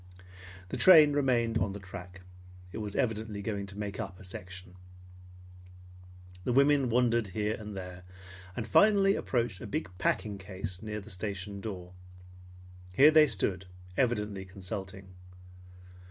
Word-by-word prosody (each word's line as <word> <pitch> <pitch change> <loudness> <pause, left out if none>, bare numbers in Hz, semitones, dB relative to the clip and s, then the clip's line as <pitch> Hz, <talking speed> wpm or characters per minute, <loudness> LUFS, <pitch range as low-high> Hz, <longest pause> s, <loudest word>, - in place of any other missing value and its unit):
The - - -3
train 155 -6 +8
remained 120 -5 +1
on 95 +1 -1
the 100 - -7
track. 95 -1 -10 0.5
It - - -6
was 105 -2 -5
evidently 110 -3 -2
going 100 -2 -3
to 100 +1 -10
make 105 0 -5
up 100 -4 -6
a - - -12
section. 95 -1 -10 1.7
The 125 - -1
women 140 0 +4
wandered 120 -2 +2
here 105 +3 -2
and 105 -2 -7
there, 90 -1 -7 0.6
and 115 -2 -3
finally 195 - +5
approached 120 - -1
a 115 - -6
big 90 -2 -4
packing 100 0 -1
case 95 -1 -6
near 105 -1 -5
the 105 +2 -12
station 100 +1 -5
door. 90 -5 -7 1.0
Here 145 +10 +7
they 155 -1 +7
stood, 95 -5 0 0.3
evidently 105 -5 0
consulting. 95 0 -7
105 Hz, 140 wpm, -30 LUFS, 95-120 Hz, 1.7 s, train